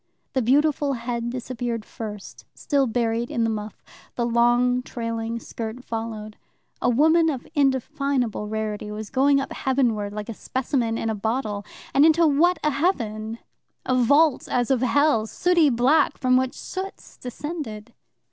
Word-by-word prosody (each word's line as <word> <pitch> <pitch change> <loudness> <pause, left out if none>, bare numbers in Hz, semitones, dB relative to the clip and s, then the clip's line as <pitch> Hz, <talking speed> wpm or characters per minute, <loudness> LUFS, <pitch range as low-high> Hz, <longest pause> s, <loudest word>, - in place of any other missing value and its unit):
The 260 - +1
beautiful 285 +3 +2
head 235 -1 -3
disappeared 240 -2 -4
first, 210 -3 -8
still 280 -3 +1
buried 230 0 -1
in 235 - 0
the 225 - +1
muff, 210 -1 -6 0.3
the 240 - 0
long 240 +1 +3
trailing 230 -2 -4
skirt 230 +2 -7
followed. 225 -2 -5 0.4
A - - +2
woman 320 +6 +4
of 265 -5 -4
undefinable 270 -5 0
rarity 215 -1 -3
was 210 0 -6
going 275 +1 +4
up 275 - -4
heaven 260 -3 +1
ward, 205 -1 -4
like 210 0 -5
a 230 - -5
specimen 240 -1 -1
in 225 - -1
a - - -1
bottle. 215 -1 -2 0.3
And 280 - +5
into 325 +1 +5
what 320 +5 +3
a 300 - +2
heaven 225 - -1 0.5
a 255 - +1
vault 285 +4 +3
as 245 +1 +1
of 255 -3 +2
hell, 260 -3 +3
sooty 345 +3 +3
black, 260 +5 +3
from 255 -1 +2
which 260 0 +1
soots 385 +1 -7
descended! 250 -4 -6
245 Hz, 155 wpm, -24 LUFS, 225-280 Hz, 0.5 s, And